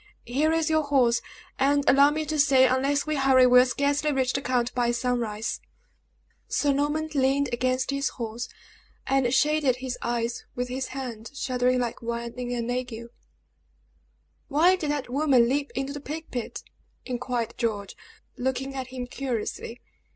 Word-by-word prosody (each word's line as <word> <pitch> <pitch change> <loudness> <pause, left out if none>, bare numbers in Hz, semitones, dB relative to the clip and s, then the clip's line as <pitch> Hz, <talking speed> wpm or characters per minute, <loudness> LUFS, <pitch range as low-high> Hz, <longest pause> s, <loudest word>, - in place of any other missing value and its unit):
Here 290 +6 +1
is 325 -1 +1
your 315 0 +3
horse; 260 -5 +2 0.4
and 280 +1 +2
allow 280 +2 +7
me 310 +1 -2
to 305 0 -2
say, 270 -3 +6
unless 275 +3 +1
we 310 -1 -1
hurry 265 -2 +5
we 250 0 +7
will 250 - +6
scarcely 285 +3 +1
reach 260 -2 +1
the 275 - -1
count 250 -2 0
by 240 -1 +1
sunrise." 235 -3 -1 0.9
Sir 285 -1 +1
Norman 295 +3 0
leaned 275 0 +2
against 255 +2 0
his 275 0 0
horse, 235 0 -5 0.6
and 265 -2 +2
shaded 295 -2 +3
his 255 0 -5
eyes 235 0 -2
with 250 0 -3
his 260 +1 -3
hand, 245 -4 -6
shuddering 255 -1 +1
like 240 -2 -3
one 235 0 -4
in 250 -1 -5
an 240 -1 -2
ague. 245 -2 -4 1.4
"Why 330 +5 +4
did 315 -5 -3
that 290 -2 -1
woman 260 -2 +3
leap 280 +3 0
into 270 +1 -2
the 290 - -7
plague 310 +3 -7
pit?" 245 -2 -5 0.4
inquired 245 -2 -3
George, 210 -4 -2 0.4
looking 265 +1 -2
at 260 -2 -4
him 255 -1 -6
curiously. 245 -2 -4
260 Hz, 160 wpm, -26 LUFS, 245-280 Hz, 1.4 s, allow